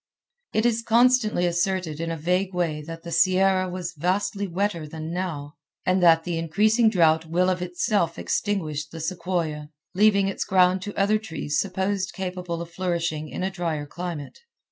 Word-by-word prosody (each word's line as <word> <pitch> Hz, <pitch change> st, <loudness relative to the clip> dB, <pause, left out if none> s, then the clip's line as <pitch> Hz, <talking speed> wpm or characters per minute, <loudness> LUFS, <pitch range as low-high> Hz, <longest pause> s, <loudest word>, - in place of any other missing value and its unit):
It 220 Hz, -, +1 dB
is 230 Hz, -1 st, +2 dB
constantly 230 Hz, -4 st, +3 dB
asserted 175 Hz, -2 st, -1 dB
in 165 Hz, -, -2 dB
a 165 Hz, -, -3 dB
vague 180 Hz, +4 st, 0 dB
way 165 Hz, -4 st, -1 dB
that 165 Hz, 0 st, -8 dB
the 170 Hz, -, -7 dB
Sierra 185 Hz, 0 st, +3 dB
was 180 Hz, -1 st, -5 dB
vastly 195 Hz, +5 st, -1 dB
wetter 180 Hz, -3 st, -2 dB
than 160 Hz, +2 st, -6 dB
now, 155 Hz, -6 st, -4 dB, 0.3 s
and 185 Hz, 0 st, +2 dB
that 165 Hz, -2 st, +6 dB
the 170 Hz, -1 st, -2 dB
increasing 215 Hz, +8 st, +3 dB
drought 165 Hz, -5 st, +3 dB
will 180 Hz, +3 st, +2 dB
of 180 Hz, -1 st, -2 dB
itself 180 Hz, -1 st, 0 dB
extinguish 155 Hz, -8 st, -2 dB
the 165 Hz, +2 st, -9 dB
sequoia, 165 Hz, -3 st, -3 dB, 0.2 s
leaving 200 Hz, 0 st, +4 dB
its 195 Hz, -, -2 dB
ground 185 Hz, 0 st, +3 dB
to 205 Hz, +2 st, -7 dB
other 210 Hz, +2 st, +3 dB
trees 160 Hz, -7 st, -3 dB
supposed 190 Hz, -1 st, -1 dB
capable 180 Hz, -2 st, -4 dB
of 170 Hz, -, -13 dB
flourishing 170 Hz, -4 st, -2 dB
in -, -, -4 dB
a 190 Hz, -, -1 dB
drier 165 Hz, -5 st, -3 dB
climate. 170 Hz, -, -6 dB
180 Hz, 165 wpm, -25 LUFS, 165-195 Hz, 0.3 s, that